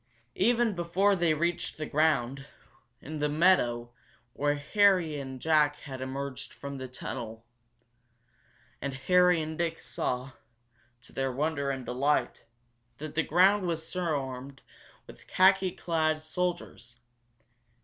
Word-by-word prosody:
Even 235 +2 +2
before 185 +3 +2
they 170 -4 +2
reached 170 +3 -2
the 155 - -3
ground, 140 -3 +1 0.6
in 155 +1 -6
the 150 0 +1
meadow 135 -8 +2 0.4
where 145 +1 +1
Harry 175 -1 +2
and 130 -1 -7
Jack 150 0 +3
had 130 -2 -8
emerged 135 0 -5
from 140 -1 -7
the 130 - -5
tunnel, 115 -2 -7 1.4
and 140 -1 -3
Harry 180 +4 +4
and 155 +1 -6
Dick 165 -1 -1
saw, 125 +2 -3 0.7
to - - -19
their 135 0 -1
wonder 140 +1 -1
and 135 -2 -3
delight, 130 0 0 0.5
that 155 0 -7
the 165 - +2
ground 180 +1 +3
swarmed 140 -6 -4 0.4
with - - -15
khaki 190 0 +4
clad 160 -3 0
soldiers. 165 -7 -4
150 Hz, 120 wpm, -29 LUFS, 135-175 Hz, 1.4 s, Harry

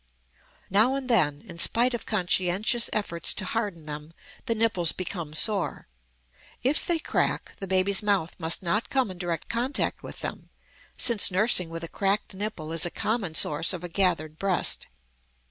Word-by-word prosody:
Now 220 +7 +4
and 275 -2 -4
then, 155 - +2
in 170 -2 -11
spite 245 +7 +3
of 240 - -4
conscientious 195 +3 +1
efforts 170 -6 -1
to 190 - -2
harden 200 -7 -3
them, 150 0 -6 0.4
the 230 - +1
nipples 215 -7 +2
become 170 -4 -5
sore. 200 +3 0 0.8
If 275 +5 +1
they 345 -2 +2
crack, 320 - -1
the 195 - -6
baby's 190 +2 +4
mouth 200 -6 0
must 165 +2 +2
not 200 +6 0
come 260 -7 0
in 180 - -10
direct 170 -3 -3
contact 245 +4 -1
with - - -9
them, - - -6 0.5
since 235 -4 +5
nursing 185 -2 +2
with 165 0 -6
a - - -4
cracked 195 +4 -1
nipple 190 -6 -5
is 165 -1 +1
a 175 - +3
common 205 -4 -2
source 160 +5 +1
of 180 -1 -6
a 175 - -4
gathered 165 -4 0
breast. 195 -3 +1
190 Hz, 165 wpm, -26 LUFS, 170-220 Hz, 0.8 s, since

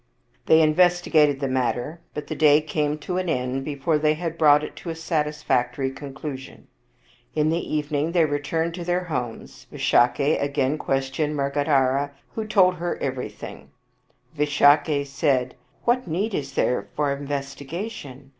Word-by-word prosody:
They 160 0 +6
investigated 155 -3 +3
the 140 - -1
matter, 130 +5 -2
but 150 - -4
the - - -5
day 150 -1 +5
came 150 -1 -1
to 180 +4 -3
an 185 -2 -2
end 130 -2 -1
before 150 +2 -1
they 155 0 +2
had 165 0 -4
brought 150 -2 +5
it - - -7
to 175 - -7
a 165 - -3
satisfactory 150 -5 -1
con 135 0 -9
clusion. 135 -2 -7 0.7
In 155 0 +2
the 165 - +1
evening 150 +1 -1
they 170 -2 +3
returned 155 +3 -1
to 175 0 -6
their 175 +1 0
homes. 120 - -6
Visakha 140 +5 +2
again 140 +1 0
questioned 135 +3 -1
Mrgadhara, 140 -1 +1 0.2
who 220 -1 -4
told 185 -4 +4
her 175 0 -3
every 130 -2 -3
thing. - - -10 0.7
Visakha 145 0 +3
said, 135 -3 0 0.2
" - - -37
What 250 +1 +1
need 195 +7 -1
is 140 -4 -3
there 125 - 0
of 140 -2 0
investigation? 140 - -6
150 Hz, 155 wpm, -24 LUFS, 140-160 Hz, 0.7 s, They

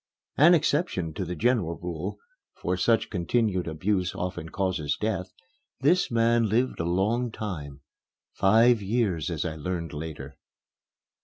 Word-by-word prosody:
An 170 +5 +7
exception 145 - 0
to 95 - -3
the 90 +1 -4
general 90 -3 +1
rule 90 +2 -5 0.4
(for 90 - -2
such 110 +5 +1
continued 95 0 0
abuse 90 +3 -1
often 90 -2 -4
causes 90 -7 -1
death), 95 -4 -2 0.5
this 175 +7 +3
man 115 -1 +2
lived 120 +5 +1
a 85 - -1
long 110 +7 +1
time 75 -11 -6 0.5
five 115 +3 +4
years, 100 -6 0
as 80 -1 -2
I 80 -2 -3
learned 85 0 -4
later. 75 0 -7
95 Hz, 135 wpm, -27 LUFS, 85-115 Hz, 0.5 s, An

